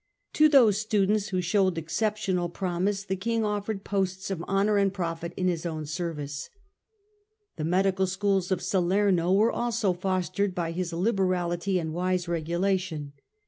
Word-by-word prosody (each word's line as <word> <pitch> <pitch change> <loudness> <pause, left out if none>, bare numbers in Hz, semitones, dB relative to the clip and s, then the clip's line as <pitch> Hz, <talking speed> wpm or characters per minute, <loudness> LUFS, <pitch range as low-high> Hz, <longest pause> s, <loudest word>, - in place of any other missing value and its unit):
To 310 0 +5
those 235 -8 +5
students 210 -1 +1
who 185 -3 -1
showed 185 0 +1
exceptional 180 +1 -1
promise 190 +3 -1
the 190 -1 -2
King 225 +3 -1
offered 205 -1 -2
posts 190 -1 -2
of 180 -4 -3
honour 200 +2 +2
and 200 -1 +3
profit 170 -3 -4
in 185 - 0
his 170 -3 -1
own 160 -3 -4
service. 150 -3 -4 1.1
The 155 - -2
medical 190 +2 +2
schools 190 0 0
of 180 -2 0
Salerno 185 -1 +2
were 210 +4 +4
also 230 -5 0
fostered 185 +1 -1
by 170 -2 -2
his 175 0 -3
liberality 185 -1 0
and 160 -3 -3
wise 180 +1 -1
regulation. 170 -2 -1
185 Hz, 145 wpm, -27 LUFS, 175-200 Hz, 1.1 s, To